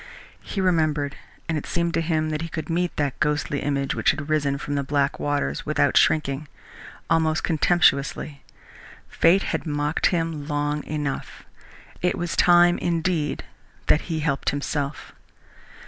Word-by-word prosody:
He 200 - -5
remembered, 155 -6 +1 0.3
and 160 -2 0
it - - -10
seemed 170 -1 -1
to 165 - +1
him 155 -1 0
that 155 0 -2
he 165 - -3
could 160 +1 -5
meet 175 +1 0
that 145 -3 -2
ghostly 150 -1 0
image 140 -1 -1
which - - +1
had 155 0 -1
risen 140 -2 +1
from 145 +1 -5
the 140 - 0
black 140 0 0
waters, 145 - -1
without - - +1
shrinking, 150 -2 +2 0.6
almost 160 -1 +1
contemptuously. 150 -4 +1 0.6
Fate 180 +4 +3
had - - -3
mocked 145 +1 +1
him 165 -4 -2
long 145 -1 -1
enough. 145 -2 -4 0.6
It 180 - +1
was 175 -1 -3
time, 175 0 +5
indeed, 165 -2 -1 0.4
that 150 - +3
he 160 -2 -1
helped 140 -3 0
himself. 145 0 -3
155 Hz, 145 wpm, -24 LUFS, 145-165 Hz, 0.6 s, time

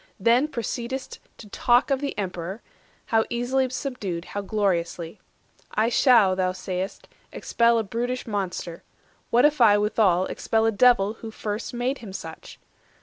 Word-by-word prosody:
Then 245 +5 +3
proceed'st 250 0 -5 0.2
to 215 - -12
talk 245 +6 +2
Of 270 0 +1
the 285 - -4
Emperor, 190 +1 -5 0.4
how 225 -1 +2
easily 255 +2 0
subdued, 210 - -4
How 205 - -5
gloriously. 185 -4 -2 0.6
I 220 +2 +2
shall, 235 -6 +5
thou 185 -1 0
say'st, 185 +1 -5 0.2
expel 235 0 +2
A 225 - +1
brutish 245 +4 -3
monster: 190 -5 -4 0.5
what 245 +4 +4
if 295 -3 +2
I 210 -3 +7
withal 205 -3 +2
Expel 220 +3 0
a 225 - +3
Devil 220 -2 +3
who 225 - -6
first 215 0 -5
made 250 +3 -1
him 210 -5 -9
such? - - -9
220 Hz, 145 wpm, -24 LUFS, 195-245 Hz, 0.6 s, I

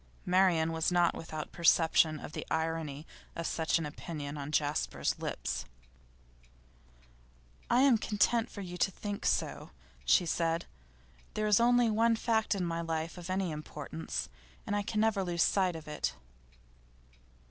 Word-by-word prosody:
Marian 180 -3 +3
was 160 +1 0
not 175 -1 +3
without 155 -2 -6
perception 160 -2 +4
of - - -8
the - - -4
irony 160 -2 -2 0.3
of 165 - -4
such 160 0 +1
an 165 - -3
opinion 150 -1 -6
on 145 0 -5
Jasper's 150 -1 0
lips. - - -3 2.1
'I 240 +2 +4
am 270 -4 +6
content 225 +3 +1
for 200 - -8
you 180 -2 -6
to - - +3
think 205 +1 -4
so,' - - -1 0.3
she 175 - +4
said. 165 0 0 0.7
'There 215 - 0
is 210 0 +5
only 240 -1 +4
one 230 +2 +3
fact 220 -1 +1
in 185 -2 -1
my 170 0 -2
life 165 0 -3
of 175 +1 -8
any 185 -2 0
importance, 150 +1 -5 0.4
and 205 - -1
I 205 - +1
can 215 +1 -1
never 220 -3 +2
lose 175 -2 +1
sight 185 -3 +2
of 160 -1 -9
it. 150 - -2
170 Hz, 150 wpm, -31 LUFS, 160-205 Hz, 2.1 s, am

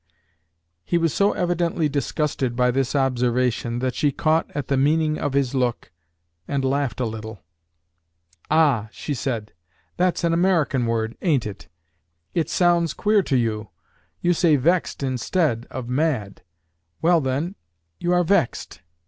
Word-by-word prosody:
He 175 - 0
was 165 -3 +1
so 200 +1 +2
evidently 175 -2 0
disgusted 140 -3 -1
by 125 0 +3
this 135 +2 -1
observation, 125 -2 +1
that 130 - 0
she 145 - +1
caught 155 +3 +1
at 145 -3 -3
the 140 - +1
meaning 155 +3 +2
of 145 - -2
his 140 -2 +1
look, 125 -7 -1 0.6
and 140 -2 -1
laughed 135 -3 -1
a 125 - 0
little. 110 -3 -7 1.1
"Ah!" 145 -9 +3
she 145 - -5
said, 115 -6 -3 0.4
"that's 180 0 +1
an 170 -1 +2
American 165 -8 +2
word, 115 0 -1
ain't 150 -9 +1
it? 105 -2 -8 0.7
It 165 -3 0
sounds 170 -3 +2
queer 210 0 +3
to 140 -8 0
you. 110 -3 -1 0.5
You 175 0 +3
say 165 -2 +3
'vexed' 165 +2 +1
instead 130 -1 0
of 130 -2 -6
'mad.' 125 -7 -1 0.6
Well, 170 0 +4
then, 140 +7 -2 0.5
you 175 - -1
are 180 0 +3
vexed." 160 - 0
140 Hz, 145 wpm, -23 LUFS, 125-165 Hz, 1.1 s, Well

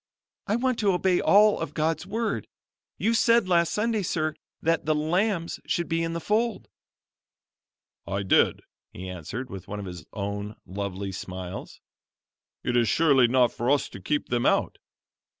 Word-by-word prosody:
"I 210 - +1
want 255 0 0
to 205 -3 +3
obey 180 0 +2
all 210 +1 +5
of 145 - -5
God's 160 +2 0
Word. 220 +1 -2 0.5
You 225 - +1
said 230 -2 +4
last 170 -2 +3
Sunday, 220 0 0
sir, 155 -4 -1 0.3
that 165 -1 0
the 155 - +3
lambs 170 +3 0
should 170 - 0
be 165 0 0
in 165 0 -2
the 170 - -2
fold." 220 +5 0 1.4
"I 100 0 -2
did," 95 - +3 0.3
he 95 +1 -8
answered, 95 - -6
with 95 +1 -8
one 105 +1 -5
of 100 - -6
his 90 -2 -8
own 100 +1 -4
lovely 100 0 -4
smiles. 95 0 -7 0.8
"It 125 - -1
is 120 -3 +3
surely 135 -2 +5
not 125 -1 +3
for 120 +2 -2
us 145 0 +2
to 95 - -10
keep 145 +10 -1
them 120 -1 +1
out. - - +1
155 Hz, 165 wpm, -26 LUFS, -, 1.4 s, all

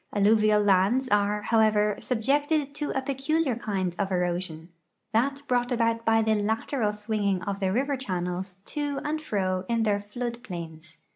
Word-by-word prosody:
Alluvial 210 0 +4
lands 205 +7 +3
are, 210 0 +2
however, 215 -2 +3
subjected 285 +4 0
to 295 0 -3
a 265 - -1
])eculiar 275 -1 0
kind 190 -5 -2
of 195 -1 -1
erosion 175 -2 -2 0.2
— - - -52
that 275 +5 +1
brought 245 0 +1
about 230 -1 +1
by 225 0 +4
the 220 0 +2
lateral 220 +2 0
swinging 210 -2 -1
of 200 0 -3
the 190 -2 0
river 275 +7 +1
channels 180 -4 -3
to 290 -2 -2
and 310 +1 -2
fro 185 -9 -1
in 230 -1 +1
their 205 -2 +2
flood 235 +3 -5
plains. 160 -4 -8
215 Hz, 160 wpm, -27 LUFS, 195-255 Hz, 0.2 s, Alluvial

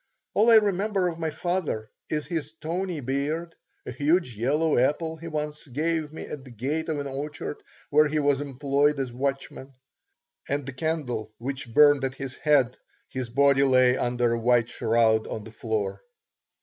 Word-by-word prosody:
All 220 +3 +4
I 230 - +8
remember 200 -2 +3
of 165 -1 -7
my 160 -1 -1
father 160 -10 -2 0.2
is 150 -1 -1
his 155 -3 -4
tawny 170 +1 -3
beard, 145 +6 -2 0.3
a - - -5
huge 145 0 +1
yellow 150 +8 +1
apple 160 +5 0
he 165 +1 -8
once 150 -1 -4
gave 155 +3 -1
me 160 - -7
at 140 - -7
the 130 - -12
gate 140 +8 -3
of 155 - -1
an 145 - -3
orchard 145 +2 -5 0.3
where 150 +1 +5
he 155 +1 -1
was 145 -2 +2
employed 140 +1 +1
as 130 -3 -3
watchman, 135 0 -4 0.7
and 140 0 -1
the 135 - -6
candle 130 -8 -3
which 130 -1 -5
burned 145 +1 +6
at 130 -1 -2
his 135 -2 -6
head 140 -5 +3 0.3
his 130 -2 -4
body 140 +2 +4
lay 130 -2 +5
under 120 -1 +1
a 115 - -1
white 120 0 +3
shroud 110 -1 +2
on 110 - -5
the 110 - -11
floor. 110 -3 -3
140 Hz, 175 wpm, -26 LUFS, 125-155 Hz, 0.7 s, I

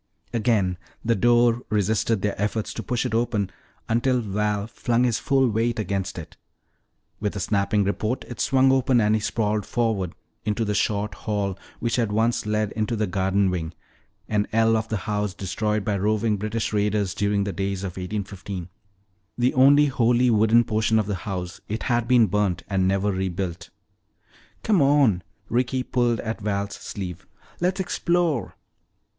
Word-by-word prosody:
Again 105 -6 +1 0.3
the 115 - +3
door 120 +2 +3
resisted 105 0 +1
their 105 - +1
efforts 105 +1 -1
to - - -5
push 120 0 -2
it - - -2
open 110 -4 0 0.4
until 125 +3 +2
Val 105 -1 -1
flung 120 +1 0
his 120 -3 +1
full 135 -1 +2
weight 115 +1 0
against 100 -3 -2
it. 85 - -9 0.8
With 105 -1 -2
a - - -3
snapping 100 +1 +1
report 105 +5 -2
it 120 - -8
swung 135 0 +4
open 130 -1 +3
and 105 -1 +3
he 110 - +1
sprawled 105 -1 0
forward 110 -6 -1 0.3
into 105 +2 -1
the 105 - -1
short 105 +1 0
hall 100 -3 -2 0.2
which 120 +1 -1
had 115 -4 +1
once 110 +1 +1
led 105 -1 0
into 110 +1 -1
the 110 -1 0
garden 95 +1 +1
wing, 85 -2 -4 0.5
an 105 -1 0
ell 115 0 +3
of 110 0 -1
the 110 - 0
house 105 -3 -1
destroyed 105 +1 -2
by 105 -2 0
roving 105 +2 +1
British 110 +2 -2
raiders 105 -2 +1
during 100 +1 +1
the 100 -1 -3
days 95 +1 -2
of 95 - -3
1815. 95 -1 -5 0.7
The 125 +1 +2
only 140 +3 +6
wholly 125 -2 +3
wooden 110 +2 +5
portion 110 0 +1
of 110 - +2
the 105 - -2 0.2
house, 90 -2 -5
it 110 +2 -3
had 120 -2 0
been 120 -2 +5
burnt 95 -4 0
and 95 -2 +1
never 100 +2 +1
rebuilt. 95 -2 -3 0.9
"Come 205 -7 +3
on," 135 -9 +4 0.3
Ricky 125 +2 0
pulled 120 -2 +1
at 110 0 -4
Val's 100 -1 -2
sleeve, 90 -4 -7 0.3
"let's 180 +3 0
explore." 175 -6 0
105 Hz, 165 wpm, -24 LUFS, 100-120 Hz, 0.9 s, only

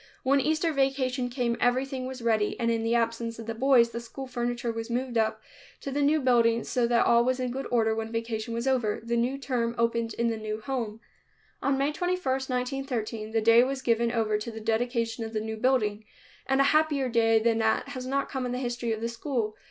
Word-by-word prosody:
When 275 +1 +3
Easter 315 +3 +1
vacation 265 -2 0
came 245 -2 -1
everything 255 +1 0
was 260 -2 -7
ready, 220 -3 +1
and 230 -1 +1
in 230 -1 0
the 230 +1 +1
absence 230 0 -1
of 225 - -8
the 225 - -3
boys, 235 -1 +4
the 235 - -4
school 235 +3 -8
furniture 240 -1 -2
was 225 +1 -5
moved 245 +1 -2
up 220 -1 +1 0.4
to 275 - -5
the 285 +2 -1
new 295 +2 +3
building 235 -3 +3
so 245 -2 0
that 235 0 +3
all 235 0 +5
was 255 +1 0
in 250 -1 -2
good 270 +2 -4
order 225 -2 +2
when 225 0 -4
vacation 230 0 -3
was 235 +3 -2
over. 245 -6 +1
The 235 +1 -1
new 245 +3 0
term 245 -4 -2
opened 230 -1 0
in 235 0 +1
the 225 - -2
new 215 0 -4
home. 225 -2 -4 0.6
On 275 -1 +1
May 280 +2 +1
21, 360 +4 -1
1913, 255 -5 -2
the 225 0 0
day 230 +2 +6
was 265 0 -3
given 235 -1 +2
over 220 -3 0
to 210 - -5
the 225 -1 -7
dedication 230 +1 -1
of 225 0 -6
the 215 - 0
new 220 +1 -4
building, 220 -3 +1 0.4
and 270 0 +2
a - - +6
happier 305 -4 +2
day 225 -2 +3
than 225 0 +2
that 220 0 +1
has 255 -1 -6
not 275 +1 0
come 260 -2 -3
in 245 - -3
the - - -2
history 240 -2 -2
of 220 - -5
the 230 - -1
school. 235 -2 -2
235 Hz, 225 wpm, -27 LUFS, 225-260 Hz, 0.6 s, day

